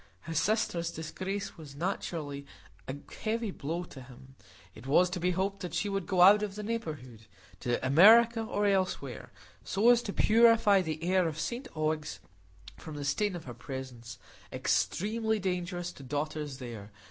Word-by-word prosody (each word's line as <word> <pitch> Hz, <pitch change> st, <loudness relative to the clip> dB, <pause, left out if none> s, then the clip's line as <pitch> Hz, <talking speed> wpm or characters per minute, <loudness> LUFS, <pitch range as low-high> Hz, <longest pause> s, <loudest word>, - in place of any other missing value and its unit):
His 165 Hz, -2 st, -2 dB
sister's 195 Hz, -6 st, 0 dB
disgrace 190 Hz, +5 st, -5 dB
was 145 Hz, -3 st, -11 dB
naturally 150 Hz, -4 st, -4 dB, 0.4 s
a 130 Hz, -, -4 dB, 0.3 s
heavy 225 Hz, -1 st, -1 dB
blow 165 Hz, +2 st, -4 dB
to 140 Hz, -6 st, -11 dB
him. 130 Hz, +1 st, -14 dB, 0.4 s
It 110 Hz, +7 st, -12 dB
was 175 Hz, +6 st, +4 dB
to 180 Hz, -, -3 dB
be 180 Hz, +1 st, +1 dB
hoped 190 Hz, +2 st, -1 dB
that 180 Hz, -4 st, -5 dB
she 200 Hz, +5 st, 0 dB
would 195 Hz, -2 st, -3 dB
go 185 Hz, -3 st, +2 dB
out 205 Hz, +3 st, +8 dB
of 205 Hz, -2 st, -3 dB
the 210 Hz, -, -5 dB
neighbourhood,—to 125 Hz, -, -5 dB
America, 225 Hz, -, +7 dB
or 210 Hz, -2 st, -1 dB
anywhere,—so 190 Hz, -, -1 dB
as 240 Hz, -1 st, +4 dB
to 205 Hz, -, -4 dB
purify 220 Hz, -2 st, +5 dB
the 160 Hz, -2 st, -4 dB
air 185 Hz, 0 st, +2 dB
of 155 Hz, -1 st, -4 dB
St 245 Hz, +9 st, -3 dB
Ogg's 155 Hz, 0 st, -2 dB, 0.6 s
from 155 Hz, -, -9 dB
the 145 Hz, -1 st, -5 dB
stain 205 Hz, +6 st, 0 dB
of 170 Hz, -, -8 dB
her 125 Hz, -, -7 dB
presence, 125 Hz, -3 st, -8 dB, 0.3 s
extremely 220 Hz, +3 st, 0 dB
dangerous 180 Hz, -2 st, -3 dB
to 145 Hz, -, -14 dB
daughters 145 Hz, +1 st, -4 dB
there! 115 Hz, -5 st, -8 dB
175 Hz, 160 wpm, -30 LUFS, 140-205 Hz, 0.6 s, out